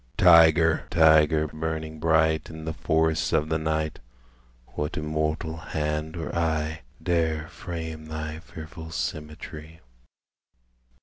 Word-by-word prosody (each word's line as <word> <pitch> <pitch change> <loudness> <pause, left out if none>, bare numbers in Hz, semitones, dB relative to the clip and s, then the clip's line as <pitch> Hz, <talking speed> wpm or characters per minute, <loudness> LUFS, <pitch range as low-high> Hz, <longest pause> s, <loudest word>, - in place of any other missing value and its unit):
Tyger, 80 -2 +6
tyger, 80 -1 +5
burning 80 0 -4
bright 80 -1 +2
In 80 0 -8
the 80 - -3
forests 80 0 +1
of 75 +1 +2
the 80 0 +1
night, 80 0 -1 0.7
What 75 +2 -3
immortal 75 +1 -2
hand 75 0 -3
or 80 - -5
eye 80 -1 -1 0.2
Dare 80 -3 0
frame 80 -5 -6
thy 80 0 -5
fearful 80 0 -10
symmetry? 80 -1 -6
80 Hz, 110 wpm, -26 LUFS, -, 0.7 s, Tyger